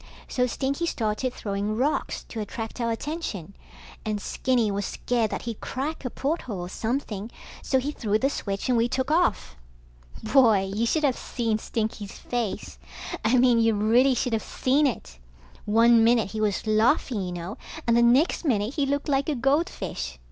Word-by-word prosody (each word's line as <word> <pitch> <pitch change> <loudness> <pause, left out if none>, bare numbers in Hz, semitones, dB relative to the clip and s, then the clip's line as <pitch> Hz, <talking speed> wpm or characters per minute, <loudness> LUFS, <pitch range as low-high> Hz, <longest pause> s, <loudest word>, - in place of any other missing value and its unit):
So 250 -1 +1
Stinky 275 +6 -1
started 225 -1 -1
throwing 205 -1 -3
rocks 280 +5 -1
to 225 - -6
attract 225 +3 -5
our 230 - 0
attention, 225 - -4 0.5
and 215 -1 -2
Skinny 240 0 0
was 200 +1 -2
scared 230 +3 -1
that - - -4
he'd 230 -3 -5
crack 285 +5 -4
a 250 - -2
porthole 260 - -3
or 175 - -6
something, 220 -1 -3 0.3
so 265 - +1
he 270 +3 -1
threw 215 -7 0
the 265 - +1
switch 200 -6 -3
and 250 - +2
we 235 +1 +2
took 260 +3 -1
off. 330 - +1 0.7
Boy, 215 -8 +4
you 225 +3 0
should 310 +5 +1
of 270 -4 +3
seen 225 -3 -2
Stinky's 215 -3 -4
face. 220 - -4 0.4
I 225 +4 +3
mean 245 -1 +5
you 225 -1 +3
really 240 +6 +4
should 245 -1 -1
of 220 - +1
seen 280 +3 +1
it. 65 - -5 0.5
One 230 +2 +5
minute 225 -4 +3
he 215 0 -3
was 210 -1 0
laughing 220 +1 +2
you 180 -1 -3
know, 175 +4 -6 0.3
and 235 - +3
the 235 - +5
next 255 +11 +4
minute 225 -5 0
he 285 -2 0
looked 285 +2 -1
like 280 +1 +1
a 300 - 0
goldfish. 235 - -1
230 Hz, 175 wpm, -26 LUFS, 210-265 Hz, 0.7 s, mean